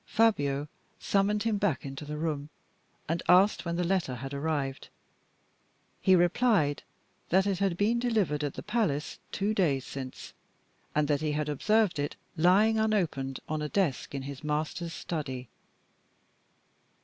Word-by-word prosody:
Fabio 145 -11 +2 0.3
summoned 205 +1 +1
him 220 -3 0
back 185 -11 0
into 135 +2 -6
the 150 +1 -5
room, 150 -2 -2 0.6
and 165 +2 -1
asked 185 +2 +5
when 170 0 -1
the 180 - 0
letter 175 -7 0
had 135 +3 -6
arrived. 140 -2 -2 1.1
He 190 - +5
replied 175 - +3 0.5
that 190 +2 +4
it 195 -3 0
had 195 -3 +1
been 220 +4 +2
delivered 210 -12 +1
at 145 - -2
the - - -6
palace 205 -10 -1
two 205 +2 0
days 145 -10 +1
since, 130 -2 -7 0.6
and 150 -1 +2
that 145 -1 +1
he 155 -1 0
had 150 0 -1
observed 210 +4 +2
it 145 - -2 0.2
lying 200 +7 +4
unopened 170 -12 0
on 155 0 -2
a 150 - -2
desk 165 -7 0
in 135 - -3
his 140 +1 -7
master's 155 +3 -2
study. 130 -7 -4
160 Hz, 150 wpm, -29 LUFS, 145-200 Hz, 1.1 s, asked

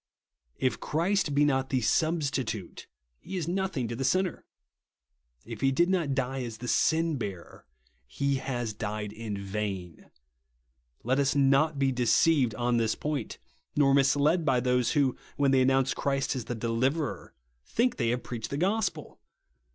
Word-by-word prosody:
If 130 - 0
Christ 170 -1 0
be 145 +1 +4
not 135 -2 +1
the 130 - +1
Substitute, 135 - -1 0.3
he 190 - -6
is 165 -3 -3
nothing 180 -8 -1
to 115 - -4
the 135 - -3
sinner. 185 +5 0 1.0
If - - -8
he 135 - +3
did 170 +6 +2
not 165 -8 0
die 135 0 -1
as 115 -3 -6
the 125 - -8
Sinheaver, 140 - -1 0.4
he 140 - -1
has 120 -4 -3
died 105 0 -4
in 110 -2 -5
vain. 100 -3 -5 0.9
Let 130 +4 +1
us 140 +1 +2
not 140 +2 +3
be 135 -1 +2
deceived 125 0 +3
on 120 +1 +1
this 115 -1 +1
point, 150 -6 -3 0.4
nor 140 -2 +4
mis 135 0 +4
led 150 +5 +2
by 130 -5 +2
those 125 -1 +1
who, 140 -4 +2 0.2
when 140 -1 +3
they 130 -1 +4
announce 135 +1 +3
Christ 135 -1 -1
as 125 -4 -4
the 120 - -4
Deliverer, 130 +7 -2 0.3
think 240 - 0
they 115 - +1
have 120 +1 -1
preached 115 -3 -5
the 140 - -3
gospel. 200 +6 -1
135 Hz, 160 wpm, -28 LUFS, 120-150 Hz, 1.0 s, be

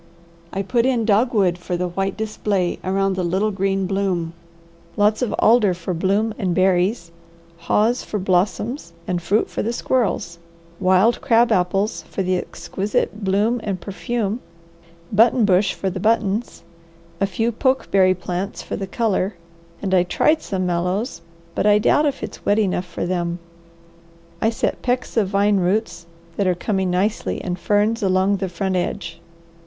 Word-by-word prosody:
I 195 - -2
put 235 +5 +1
in 240 -4 +1
dogwood 205 -5 +2
for 180 0 -3
the 180 0 -2
white 195 +3 -2
display 205 -4 -1
around 195 +1 0
the 185 - -1
little 190 +5 0
green 195 0 0
bloom, 185 -4 -1 0.6
lots 210 +2 +3
of 245 -4 0
alder 215 -5 +4
for 180 +1 -4
bloom 200 +6 +1
and 185 -5 0
berries, 185 0 +1 0.5
haws 215 +8 +1
for 210 - -4
blossoms 190 - -1
and 175 -1 -1
fruit 205 +5 +1
for - - -4
the 225 - -1
squirrels, 225 -8 -1 0.4
wild 190 +4 +3
crab 235 -1 +3
apples 195 +4 +1
for 195 - -2
the 185 0 +1
exquisite 200 +3 -3
bloom 210 +5 +1
and 195 -3 -2
perfume, 210 +4 -3 0.7
button 225 +2 +5
bush 190 0 +3
for 190 - -2
the 185 - -5
buttons, 220 +1 0 0.6
a 195 - +2
few 225 +5 -1
pokeberry 200 -7 +2
plants 180 +2 -4
for - - -4
the 195 - -4
colour, 205 -3 0 0.5
and 190 -1 -1
I 185 - +5
tried 305 - +2
some 185 -2 -2
mallows, 180 +7 -1 0.3
but - - 0
I 210 0 +6
doubt 295 +8 +3
if 280 -1 -3
it's 215 - -7
wet 205 - +2
enough 190 -4 0
for 175 - -4
them. 175 -1 -1 1.0
I 220 - +3
set 230 - -2
pecks 250 0 -1
of 220 -4 +2
vine 200 +1 +2
roots, 185 -1 -1 0.3
that 200 - +1
are 180 - +2
coming 190 0 -1
nicely, 195 +5 0
and 180 -1 -3
ferns 210 +4 +1
along 190 +1 +2
the 190 -1 -3
front 185 +2 -2
edge. 170 -2 -3
195 Hz, 160 wpm, -21 LUFS, 185-220 Hz, 1.0 s, I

